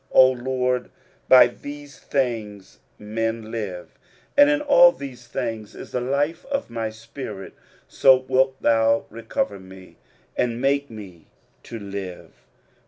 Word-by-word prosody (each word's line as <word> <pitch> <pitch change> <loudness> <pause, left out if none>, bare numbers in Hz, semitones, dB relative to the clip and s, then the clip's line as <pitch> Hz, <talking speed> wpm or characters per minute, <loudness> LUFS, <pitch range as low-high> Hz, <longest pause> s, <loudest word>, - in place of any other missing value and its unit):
23:038:016 - - -40
O 130 0 +8
LORD, 125 0 -1 0.4
by 130 -1 +9
these 145 +4 -9
things 110 -7 -3 0.2
men 115 +1 -3
live, 100 -6 -6 0.4
and 285 0 +7
in 295 0 +2
all 280 -12 +6
these 130 -5 -10
things 110 -2 -5
is - - -10
the 125 - -2
life 140 +6 -1
of 275 0 -3
my 115 -1 -3
spirit: 110 -2 -9 0.3
so 135 -1 +5
wilt 130 0 +2
thou 115 0 +3
recover 110 -3 -3
me, 95 0 -14 0.4
and 120 -1 -1
make 140 +2 +1
me 95 -7 -11 0.3
to 115 - -8
live. 100 -3 -7
120 Hz, 135 wpm, -23 LUFS, 110-135 Hz, 0.4 s, by